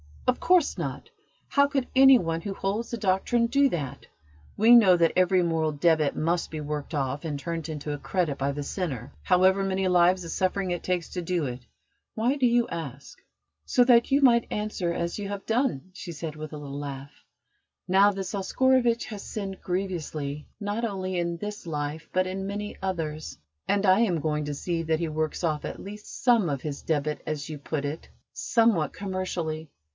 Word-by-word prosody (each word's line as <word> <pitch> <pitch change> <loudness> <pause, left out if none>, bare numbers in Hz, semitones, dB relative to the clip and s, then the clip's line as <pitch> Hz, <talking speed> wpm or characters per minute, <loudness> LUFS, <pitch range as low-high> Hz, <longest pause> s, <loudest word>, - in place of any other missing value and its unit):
"Of 250 - +1
course 360 -4 +3
not! - - -5 0.4
How 280 0 +4
could 275 -3 -1
any 270 0 +8
one 165 -5 -2
who 200 +1 -4
holds 205 +5 -2
the 235 - -3
Doctrine 210 +4 +1
do 280 +3 +3
that? 140 - -5 0.5
We 225 +3 +6
know 205 -7 +8
that 165 -1 +3
every 185 0 +4
moral 160 -2 0
debit 155 -1 +2
must 170 +2 0
be 155 -1 -5
worked 150 +1 -4
off 140 0 -2
and 150 -3 -2
turned 165 +2 -4
into 150 -1 -4
a 145 - -5
credit 170 -6 -1
by 140 +1 -1
the 145 +1 -4
sinner, 140 - -4
however 190 +1 +4
many 190 0 0
lives 180 0 +4
of 165 - -6
suffering 185 0 0
it 175 - -2
takes 180 -2 -1
to 180 - -4
do 175 -2 -1
it. 125 -1 -6 0.5
Why 240 +5 +1
do 255 -3 +3
you 240 0 +3
ask?" 140 -5 -7 0.5
"So 250 - +4
that 240 -1 +5
you 275 +1 +3
might 235 -3 +5
answer 210 -5 -2
as 170 +3 -2
you 200 - -4
have 200 -1 -5
done!" 225 - 0
she 175 -2 -7
said, 155 -1 -6
with 155 0 -7
a - - -5
little 140 -1 -6
laugh. 140 -1 -6 0.8
"Now 195 +2 +5
this 195 -1 -5
Oscarovitch 240 +4 +2
has 210 -3 -7
sinned 195 -3 -6
grievously, 160 -6 -3
not 205 +3 -3
only 185 -4 -2
in 170 0 -1
this 210 0 -6
life 150 0 -4
but 185 0 +2
in 190 +1 -4
many 205 +1 -4
others, 160 - -3 0.3
and 200 0 +2
I 190 +1 +5
am 190 -8 +2
going 150 -1 -1
to 145 0 -3
see 170 +3 -2
that 160 -1 0
he 170 -2 -1
works 155 +2 -2
off 155 -3 0
at - - -6
least 210 +1 -9
some 230 -8 +4
of 140 -3 -2
his 145 -2 -5
debit 150 -1 -1
as 155 -1 -3
you 155 -2 -6
put 145 0 -3
it 150 +3 -5 0.2
somewhat 225 -10 +2
commercially. 175 -5 -3
180 Hz, 195 wpm, -27 LUFS, 155-205 Hz, 0.8 s, any